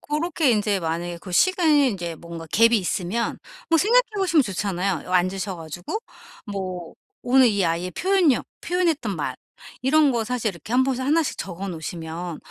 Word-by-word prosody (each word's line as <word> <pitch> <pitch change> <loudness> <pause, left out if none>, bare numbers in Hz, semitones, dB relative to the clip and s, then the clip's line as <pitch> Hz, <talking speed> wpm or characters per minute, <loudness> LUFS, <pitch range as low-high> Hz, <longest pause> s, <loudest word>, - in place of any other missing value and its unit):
고렇게 305 -1 0
인제 205 -3 +1
만약에 170 +1 -3
그 185 - -9
시간이 315 - +4
인제 175 -4 -4
뭔가 170 0 -9
갭이 230 +8 +4
있으면 195 +3 -1 0.3
뭐 330 -1 +4
생각해 475 +7 +5
보시면 345 -6 +3
좋잖아요. 190 - -2
어 - - -4
앉으셔 185 +1 0
가지고 175 - -5 0.5
뭐 185 -4 -5 0.3
오늘 260 +1 +5
이 200 -3 +1
아이의 170 +2 -1
표현력, 365 -8 +2 0.2
표현했던 330 - 0
말 130 -4 -3 0.5
이런 295 +2 +4
거 230 -2 0
사실 245 -2 -1
이렇게 190 +5 -10
1 255 +1 +5
곳에 260 -1 -1
하나씩 300 +3 +1
적어 190 +1 -5
놓으시면 165 0 -5
205 Hz, 350 characters per minute, -23 LUFS, 175-290 Hz, 0.5 s, 생각해